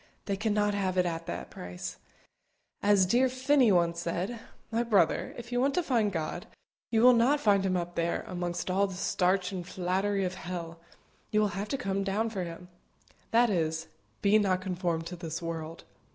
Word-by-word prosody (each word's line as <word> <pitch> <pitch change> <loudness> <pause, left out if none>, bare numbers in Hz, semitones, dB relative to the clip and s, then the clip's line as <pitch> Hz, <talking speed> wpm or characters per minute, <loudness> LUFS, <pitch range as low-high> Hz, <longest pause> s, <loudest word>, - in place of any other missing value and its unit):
They 200 - -1
cannot 210 0 +1
have 190 -2 -1
it 180 - +4
at 165 -1 -3
that 65 - -5
price. 90 0 -7 0.8
As 200 -2 +4
dear 245 +7 +3
Finney 260 -1 +3
once 170 -2 +2
said, 175 +7 -3 0.3
"My 230 +1 +1
brother, 210 -8 +2
if 240 0 -9
you 245 0 +1
want 275 +1 +2
to 360 - +2
find 230 -9 +1
God, 160 -4 -4 0.4
you 225 0 +2
will 250 0 +9
not 250 +5 +4
find 200 -6 +3
Him 185 -1 +1
up 175 0 -3
there, 170 0 -1
amongst 175 0 -3
all 200 +2 +2
the 190 - -7
starch 185 0 +1
and 185 -2 -4
flattery 190 +3 -1
of 180 - -2
hell; 170 -2 -6 0.5
you 215 - +2
will 210 -1 +3
have 200 +1 -4
to 275 - -1
come 195 -3 -1
down 210 +4 0
for 190 -4 -3
Him." 170 +1 -9 0.6
That 235 0 +4
is 160 -3 0
it - - -23 0.3
"Be 205 +2 +5
not 190 -3 +2
conformed 175 -3 -2
to 180 - -6
this 165 -2 -5
world." 165 -1 -5
190 Hz, 195 wpm, -29 LUFS, 175-215 Hz, 0.8 s, will